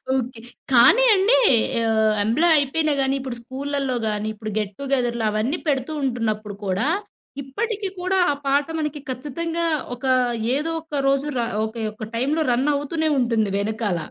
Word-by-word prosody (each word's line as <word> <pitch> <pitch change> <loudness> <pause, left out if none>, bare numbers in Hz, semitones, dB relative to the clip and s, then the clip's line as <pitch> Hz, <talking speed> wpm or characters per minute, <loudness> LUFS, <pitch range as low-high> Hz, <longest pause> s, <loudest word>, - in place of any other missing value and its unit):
Okay. 250 -2 -3 0.3
కానీ 260 - +7
అండి 400 +6 +4 0.5
ఆహ్, 220 -1 +3
ఎంప్లాయ్ 315 +10 +3
అయిపోయినా 300 +2 +1
గానీ 270 0 +1
ఇప్పుడు 260 -2 -5
స్కూళ్ళళ్ళో 270 +1 -3
గాని, 210 0 -2
ఇప్పుడు 215 0 -7
గెట్ 205 -1 -3
టు 280 - -5
గెదర్లు 240 -3 0
అవన్నీ 215 +9 -1
పెడుతూ 275 -1 0
ఉంటున్నప్పుడు 215 -5 -2
కూడా 195 +8 0 0.6
ఇప్పటికి 410 - -3
కూడా, 370 +1 0
ఆ - - +1
పాట 280 +1 +2
మనకి 300 -1 -3
ఖచ్చితంగా 325 +6 -3 0.3
ఒక 250 - -9 0.5
ఏదో 310 +4 -1
ఒక్క 320 -2 -8
రోజు 275 +1 +1
ర - - +1 0.2
ఒకే 220 +1 -6
ఒక 215 +1 -7
టైంలో 280 +7 0
రన్ 250 +4 +1
అవుతూనే 315 +3 -1
ఉంటుంది 230 -4 +1
వెనకాల. 205 -2 -1
265 Hz, 155 wpm, -22 LUFS, 225-300 Hz, 0.6 s, కానీ